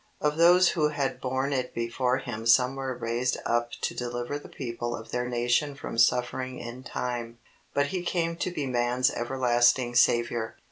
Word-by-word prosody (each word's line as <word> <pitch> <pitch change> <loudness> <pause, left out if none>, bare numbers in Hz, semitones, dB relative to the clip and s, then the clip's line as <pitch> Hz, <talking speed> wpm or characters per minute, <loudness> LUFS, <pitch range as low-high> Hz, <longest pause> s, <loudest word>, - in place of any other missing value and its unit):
Of 150 0 0
those 175 +2 +6
who 155 -4 +2
had 145 -2 -2
borne 130 +2 -1
it 130 -2 -2
before 125 +2 0
Him 115 -4 -5
some 125 +2 +5
were 135 -2 -4
raised 120 +2 -1
up 120 0 +1
to - - -1
deliver 120 +3 -4
the - - -13
people 120 -2 -4
of 115 - -10
their 125 0 -2
nation 120 +4 +1
from 125 -4 -5
suffering 125 +2 +1
in 120 +2 -7
time, 120 -2 -4 0.4
but 145 - +3
He 180 +5 -3
came 170 -1 -1
to 185 - -1
be 150 -5 -3
man's 125 0 +1
everlasting 120 0 +2
Saviour. 120 -1 +2
125 Hz, 175 wpm, -27 LUFS, 120-140 Hz, 0.4 s, those